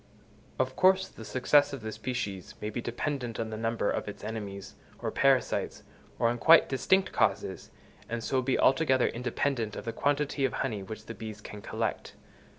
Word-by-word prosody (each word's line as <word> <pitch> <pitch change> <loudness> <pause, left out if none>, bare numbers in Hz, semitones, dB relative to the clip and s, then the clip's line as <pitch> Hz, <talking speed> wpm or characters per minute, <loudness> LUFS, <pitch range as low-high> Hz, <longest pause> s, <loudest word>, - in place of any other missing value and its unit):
Of 130 0 0
course 190 +1 +4
the 115 - -11
success 145 +5 +3
of 135 - -5
the 110 0 -4
species 110 -4 -4
may 105 - -4
be 120 - -3
dependent 120 -1 -3
on 110 -1 -3
the - - -3
number 115 -1 0
of - - -3
its 105 - -8
enemies, 105 -3 -6 0.2
or - - -3
parasites, - - +1 0.3
or 115 - +3
on 120 +1 0
quite 165 +4 +7
distinct 190 +9 +2
causes, - - 0 0.4
and 115 0 -3
so 130 +2 +1
be 130 +1 +1
altogether 135 -1 +4
independent 120 -2 -2
of - - -7
the 115 - -3
quantity 145 +1 0
of 135 - +1
honey 110 -7 -2
which 110 +3 -8
the 115 - -6
bees 110 0 -7
can 105 0 -9
collect. - - -3
120 Hz, 180 wpm, -29 LUFS, 110-135 Hz, 0.4 s, quite